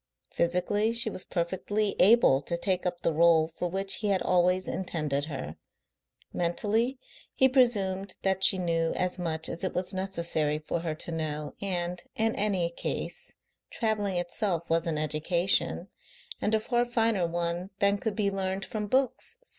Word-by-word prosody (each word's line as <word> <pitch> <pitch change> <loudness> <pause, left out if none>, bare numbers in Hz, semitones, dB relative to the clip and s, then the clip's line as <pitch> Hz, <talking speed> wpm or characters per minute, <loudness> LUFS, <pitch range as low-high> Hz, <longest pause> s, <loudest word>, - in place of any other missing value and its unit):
Physically 205 +6 +1
she 230 -2 +5
was 185 - -4
perfectly 190 +4 -1
able 195 - +6
to 170 +2 -3
take 185 0 0
up 175 -1 -4
the 165 - +1
role 160 0 +4
for 170 +2 -4
which 195 +2 0
he 215 - -2
had 195 -2 +1
always 180 +1 +2
intended 150 -6 -2
her; 110 - -6 0.8
mentally 215 +9 0 0.4
he 265 - +5
presumed 200 -7 +2
that 190 0 +1
she 190 0 +6
knew 165 -2 0
as 180 0 0
much 160 -2 -2
as 170 - -3
it 185 - -2
was 180 +1 -1
necessary 170 -5 0
for 155 +2 -3
her 165 -2 -3
to 165 - -7
know, 150 -3 -3
and, 180 -2 -2
in 225 0 0
any 190 -5 0
case, - - -4 0.3
travelling 210 -5 -1
itself 175 -1 -1
was 165 0 +2
an 160 -2 -1
education, 155 +5 0 0.5
and 215 +2 +2
a - - +2
far 240 +2 +1
finer 225 -6 +1
one 170 +2 -2
than 200 0 +2
could 220 -1 -2
be 200 -2 +1
learned 195 0 -2
from 210 -1 -4
books. 265 - 0
185 Hz, 160 wpm, -28 LUFS, 170-205 Hz, 0.8 s, able